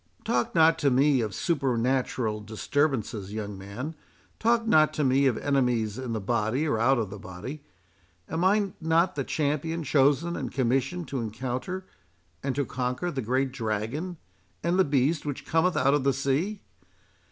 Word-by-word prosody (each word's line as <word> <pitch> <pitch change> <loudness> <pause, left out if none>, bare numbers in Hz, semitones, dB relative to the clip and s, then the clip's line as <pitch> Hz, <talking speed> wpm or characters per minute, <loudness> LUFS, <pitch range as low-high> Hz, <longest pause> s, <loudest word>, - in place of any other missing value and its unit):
"Talk 120 -1 0
not 165 0 +5
to 145 - +3
me 135 0 +4
of 105 -4 -3
supernatural 130 -6 0
disturbances, 110 -2 -1
young 105 -2 -4
man—talk 150 - -3
not 155 -8 +4
to 150 - 0
me 135 +1 +4
of 125 - +1
enemies 125 -6 0
in 130 -2 -4
the 110 - -1
body 115 +7 0
or 115 - 0
out 130 +4 +4
of 110 -5 -2
the 100 - -7
body. 95 +12 -8 0.7
Am 165 +3 -2
I 200 0 +2
not 165 +3 +2
the 140 - -2
champion 155 +4 -1
chosen 145 +4 +2
and 130 -4 -4
commissioned 135 +6 0
to 135 - -2
encounter 125 - -4 0.6
and 135 -1 -2
to 140 -1 0
conquer 125 +8 -2
the 135 - -3
great 130 +3 0
Dragon, 125 - -3 0.5
and 175 +3 +1
the - - +7
Beast 145 +1 +1
which 145 -3 -5
cometh 165 +3 +2
out 135 +2 +3
of 145 -2 +2
the 140 0 +3
sea? 145 +10 -1
135 Hz, 165 wpm, -27 LUFS, 120-160 Hz, 0.7 s, the